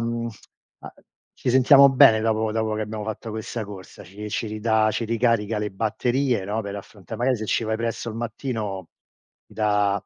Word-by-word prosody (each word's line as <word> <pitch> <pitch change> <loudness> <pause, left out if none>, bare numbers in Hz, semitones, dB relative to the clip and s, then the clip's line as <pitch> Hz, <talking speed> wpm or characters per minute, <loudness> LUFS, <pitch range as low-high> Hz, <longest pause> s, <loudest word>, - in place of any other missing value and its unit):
mhmm, 115 0 -2 0.5
a - - -10 0.4
ci - - -1
sentiamo 135 +2 +7
bene 115 -4 +6
dopo 110 -1 0
dopo 110 -1 -1
che 110 - -2
abbiamo 105 0 -5
fatto 110 +1 -5
questa 110 +1 -5
corsa, 100 -2 -11
ci 105 +4 -8
ci 110 +1 -2
ridà 110 0 +1
ci 115 - -2
ricarica 115 -2 +1
le 105 -1 -2
batterie 115 +3 0
no, 105 +3 -2
per 100 0 -6
affronta 100 +1 -9
magari 125 +3 +1
se 110 - -5
ci 115 - 0
vai 110 0 -1
presto 115 0 -3
al 110 - -6
mattino, 110 - -4 0.6
ti - - -21
dà 105 -2 +2
110 Hz, 185 wpm, -24 LUFS, 105-115 Hz, 0.6 s, sentiamo